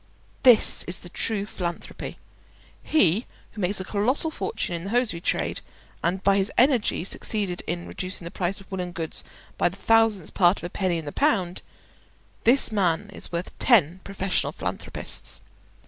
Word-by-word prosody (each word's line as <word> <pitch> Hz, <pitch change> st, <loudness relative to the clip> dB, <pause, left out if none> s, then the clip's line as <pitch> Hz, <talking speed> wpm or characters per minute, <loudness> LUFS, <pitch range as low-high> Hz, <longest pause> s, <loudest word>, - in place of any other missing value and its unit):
This 245 Hz, -4 st, +6 dB
is 175 Hz, -, +1 dB
the 175 Hz, -, -8 dB
true 205 Hz, +2 st, -1 dB
philanthropy. 175 Hz, -4 st, -6 dB, 0.6 s
He 215 Hz, -, +3 dB, 0.2 s
who 215 Hz, -, -7 dB
makes 190 Hz, +2 st, 0 dB
a -, -, -3 dB
colossal 240 Hz, -, 0 dB
fortune 220 Hz, -, -3 dB
in 170 Hz, +1 st, -4 dB
the -, -, -4 dB
hosiery 225 Hz, -7 st, +1 dB
trade, -, -, -1 dB, 0.4 s
and 185 Hz, +3 st, 0 dB
by 200 Hz, 0 st, +4 dB
his 195 Hz, 0 st, 0 dB
energy 250 Hz, -3 st, +4 dB
has 185 Hz, -, -3 dB
succeeded 200 Hz, -5 st, 0 dB
in 175 Hz, +1 st, -3 dB
reducing 185 Hz, -2 st, -4 dB
the 170 Hz, -, -6 dB
price 190 Hz, +1 st, -2 dB
of 195 Hz, 0 st, -16 dB
woollen 180 Hz, -2 st, -4 dB
goods 165 Hz, -2 st, 0 dB, 0.4 s
by -, -, +3 dB
the 185 Hz, -, -12 dB
thousandth 225 Hz, -5 st, +2 dB
part 180 Hz, 0 st, +4 dB
of -, -, -9 dB
a 175 Hz, -, -5 dB
penny 185 Hz, -3 st, 0 dB
in 160 Hz, -, -6 dB
the 145 Hz, -, -5 dB
pound—this 230 Hz, -, 0 dB
man 200 Hz, -1 st, 0 dB
is -, -, -5 dB
worth 170 Hz, +1 st, -4 dB
ten 185 Hz, -, +4 dB
professional 195 Hz, -1 st, -1 dB
philanthropists. -, -, -3 dB
190 Hz, 165 wpm, -25 LUFS, 175-220 Hz, 0.6 s, This